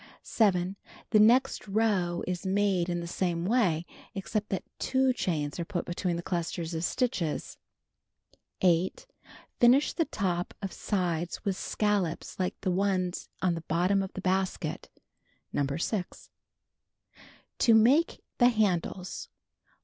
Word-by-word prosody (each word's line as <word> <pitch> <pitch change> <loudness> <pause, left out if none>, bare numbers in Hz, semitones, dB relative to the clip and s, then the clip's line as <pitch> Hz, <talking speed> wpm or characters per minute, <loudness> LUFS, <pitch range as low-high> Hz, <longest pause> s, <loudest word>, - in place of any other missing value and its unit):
7. 190 -3 +1 0.3
The 215 - +6
next 245 +3 +4
row 195 -5 +1
is 180 -1 -3
made 190 -2 +1
in 175 0 -1
the - - -5
same 175 -1 -1
way, 185 -7 +2 0.3
except 205 +2 -2
that 190 - -2 0.2
2 265 -1 +2
chains 155 - -2
are - - 0
put 175 +1 -3
between 175 0 -2
the 170 - -4
clusters 170 -1 -3
of 160 0 -2
stitches. 180 - -1 1.0
8. 180 - +2 0.5
Finish 250 +4 +5
the 330 - +1
top 180 -7 -2
of 195 -2 -5
sides 175 -4 -2
with 195 -2 +1
scallops 200 -5 -1
like 185 - -1
the 185 - 0
ones 185 -1 0
on 180 -2 +3
the 165 - -4
bottom 180 +5 +1
of 190 - -4
the 190 - -5
basket. 185 -3 -1
(See - - -31 0.5
No. 140 0 0
6.) 180 +2 -3 1.3
To 230 -3 +6
Make 260 +10 +4 0.2
the 245 -1 +7
Handles: 190 -4 -1
1. - - -56
185 Hz, 140 wpm, -29 LUFS, 175-210 Hz, 1.3 s, the